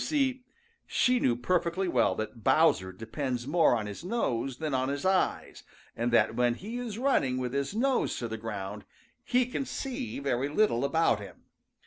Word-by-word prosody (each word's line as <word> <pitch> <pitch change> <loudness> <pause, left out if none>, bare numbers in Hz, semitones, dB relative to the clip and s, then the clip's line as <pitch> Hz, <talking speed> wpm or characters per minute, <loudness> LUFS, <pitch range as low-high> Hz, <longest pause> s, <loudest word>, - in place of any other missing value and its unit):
You - - -2
see, 265 -4 0 0.4
she 250 0 +2
knew 120 - +2
perfectly 175 +7 0
well 120 - +2
that 110 +2 -5
Bowser 130 - +3
depends 120 +5 -4
more 155 -2 +4
on 110 -2 -2
his 105 +8 -7
nose 135 - -1
than 155 -1 -3
on 130 0 +1
his 140 +3 -3
eyes, 190 -1 0 0.3
and 120 +1 -1
that 115 - +4
when 120 0 +2
he 220 - -6
is 230 -4 -5
running 230 - +1
with 125 -1 -3
his 140 +7 -2
nose 260 +3 +1
to 120 - -3
the 110 - -4
ground, 105 -2 -5 0.4
he 250 0 +2
can 250 +2 -3
see 260 -1 -4
very 140 -1 -1
little 150 - +2
about 140 -6 +2
him. 100 -2 -11
140 Hz, 180 wpm, -29 LUFS, -, 0.4 s, more